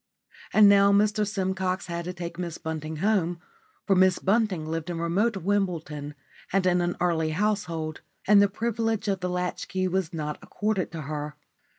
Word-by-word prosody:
And 215 -1 +7
now 200 0 +6
Mr 210 +1 +3
Simcox 190 -2 -1
had 170 -1 -4
to 180 - -3
take 175 -1 -7
Miss 170 -2 -4
Bunting 160 0 -5
home, 175 -5 +1 0.5
for 195 - +3
Miss 185 0 +4
Bunting 195 -5 +1
lived 160 +1 -4
in 175 - -3
remote 195 +7 +1
Wimbledon 165 -7 -2 0.4
and 195 0 +2
in 180 -1 +3
an 175 0 -1
early 165 -3 +1
household, 170 -5 -1 0.3
and 205 0 +7
the 200 - +4
privilege 225 0 -1
of 195 -2 0
the 180 0 -2
latch 180 0 -3
key 185 0 -1
was 185 -2 -1
not 150 -2 -4
accorded 210 -5 -2
to 165 - -5
her. 150 0 -5
180 Hz, 175 wpm, -26 LUFS, 165-200 Hz, 0.5 s, And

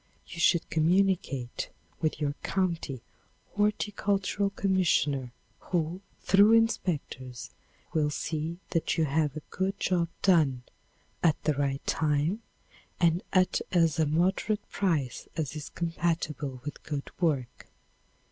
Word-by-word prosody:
You 170 - -9
should 170 0 +3
communicate 160 -7 +1 0.3
with 155 -2 -1
your 145 -2 0
county 170 - -1 0.5
horticultural 205 -1 0
commissioner, 175 -10 +1 0.3
who, 175 +1 -2 0.2
through 205 +3 +6
inspectors, 150 - 0 0.4
will 150 -2 +2
see 155 +2 -3
that 165 0 0
you 160 - +3
have 150 0 0
a 155 - -6
good 195 +2 -1
job 175 -2 +1 0.2
done, 150 -10 +4 0.6
at 160 -3 +3
the 155 - +2
right 140 -1 -1
time 155 +7 +1 0.6
and 170 0 +3
at 185 -1 +3
as 165 -3 +3
moderate 175 +7 +1
price 160 -10 -1
as 150 -3 -2
is 150 -2 -6
compatible 165 -6 -2
with 145 - -6
good 145 -3 -5
work. 140 -8 -1
165 Hz, 115 wpm, -29 LUFS, 145-185 Hz, 0.6 s, through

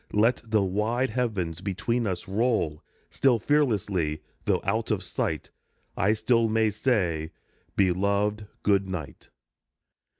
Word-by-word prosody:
Let 115 +4 +3
the 110 -3 +2
wide 110 +6 0
heavens 100 -9 -2
between 110 +4 -1
us 95 +2 -3
roll; 100 -7 0 0.3
Still 130 -3 +3
fearlessly, 100 - +1 0.2
though - - +2
out - - -1
of - - 0
sight, - - -3 0.4
I 100 +3 +3
still 115 +1 +2
may 110 0 +2
say, 95 -9 0 0.2
" - - -39
Beloved, 100 +3 +1 0.2
good 100 -2 +2
night." 80 -9 -6
105 Hz, 125 wpm, -27 LUFS, 95-115 Hz, 0.4 s, Let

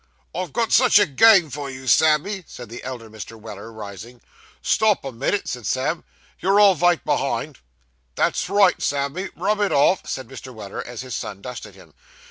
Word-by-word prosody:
'I've 180 -3 -4
got 230 - -1
such 250 -2 +6
a 205 - +6
game 175 +1 +5
for 140 +1 -5
you, 130 0 -9
Sammy,' 160 +8 +3
said 120 -2 -10
the 120 +2 -9
elder 125 -3 -7
Mr. 110 +1 -10
Weller, 110 +1 -9
rising. 110 +2 -10 0.4
'Stop 215 -8 +2
a 135 - -4
minit,' 135 - -1
said 120 -4 -4
Sam, 135 +8 -1 0.4
'you're 195 +2 +3
all 205 -2 +7
vite 175 0 +2
behind.' - - -1 0.6
'That's - - 0
right, 200 -2 +4
Sammy, 145 +7 -2
rub 205 +4 0
it 205 - +1
off,' 150 +6 +2
said 130 -2 -4
Mr. 130 0 -10
Weller, 100 -3 -6
as 120 -1 -7
his 130 -2 -7
son 100 -4 -5
dusted 125 -1 -8
him. - - -17
140 Hz, 180 wpm, -22 LUFS, 120-190 Hz, 0.6 s, all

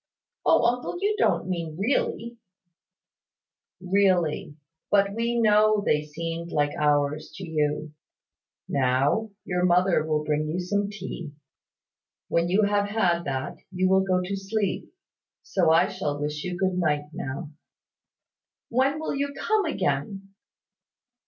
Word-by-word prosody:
"Oh, - - +5
uncle, 245 +7 0
you 410 +2 +1
don't - - +2
mean 165 -4 -3
really?" 235 +1 -1 1.4
"Really: 180 -5 +1 0.3
but 200 -1 +3
we 235 +2 0
know 215 -1 +4
they 150 - +3
seemed 165 +3 -5
like 145 -1 +1
hours 150 0 +1
to 190 - -7
you. 150 -1 -1 0.7
Now, 140 - +1 0.2
your 180 0 -1
mother 180 -2 +3
will 155 -1 0
bring 150 0 0
you 165 +4 -2
some 200 +3 -1
tea. 180 -6 -7 1.0
When 170 +1 +1
you 200 +4 +3
have 205 0 +2
had 175 -5 +1
that, 135 -1 -3
you 185 0 +1
will 190 0 +5
go 185 -1 +1
to 195 +2 -3
sleep: 195 0 -2 0.5
so 175 -4 +1
I 165 +3 +5
shall 185 -7 -3
wish 150 0 -3
you 180 -1 -4
good 185 0 0
night 150 -3 0
now." 145 +2 -5 1.2
"When 270 +5 +2
will 315 - -3
you 280 0 -2
come 435 -3 +1
again?" 195 - -2
180 Hz, 135 wpm, -26 LUFS, 155-205 Hz, 1.4 s, Oh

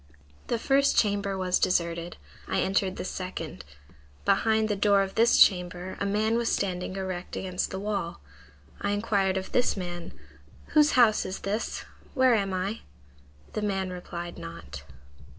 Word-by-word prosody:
"The 235 - 0
first 275 +4 +2
chamber 200 -2 +1
was 185 -1 +1
deserted. 170 -1 0 0.3
I - - 0
entered 190 0 +1
the - - -5
second. 180 - -5 0.6
Behind 220 -1 +3
the 210 - 0
door 200 0 +4
of 195 - -5
this 230 +1 +4
chamber 180 -1 +3
a 200 - 0
man 215 +3 +1
was 235 -1 0
standing 185 -1 -1
erect 185 -2 -4
against 185 -1 -2
the 190 - -4
wall. 200 - -3 0.6
I 200 - 0
inquired 200 -3 +1
of 190 - -5
this 245 -4 +2
man, 175 -2 -5 0.6
'Whose 300 0 +4
house 230 -4 +5
is 190 0 -5
this? 205 +3 -3 0.3
Where 260 -2 +5
am 200 -3 +1
I?' 190 +4 -2 0.7
The 215 - -2
man 195 -2 -1
replied 175 -1 -7
not. 70 -5 -8
195 Hz, 150 wpm, -27 LUFS, 180-215 Hz, 0.7 s, house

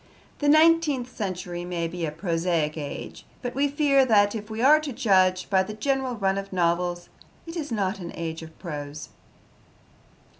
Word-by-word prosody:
The 290 - +2
nineteenth 310 -5 +4
century 180 -3 -4
may 175 -1 -2
be 170 -1 -4
a - - -3
prosaic 165 -2 -1
age, 145 -3 -7 0.2
but 245 - -3
we 280 +2 +2
fear 280 -1 +3
that, 205 -5 +4
if 215 -1 -6
we 220 0 -5
are 290 +5 +6
to 305 -2 -5
judge 185 -5 +2
by 190 -2 +3
the 210 +3 -5
general 265 +1 -1
run 195 -2 0
of 195 0 -8
novels, 175 0 0 0.4
it 330 0 -8
is 305 -6 -4
not 195 -2 -1
an 170 -2 -6
age 165 -1 -4
of 160 0 -12
prose. 150 -3 -7
195 Hz, 175 wpm, -25 LUFS, 170-260 Hz, 0.4 s, are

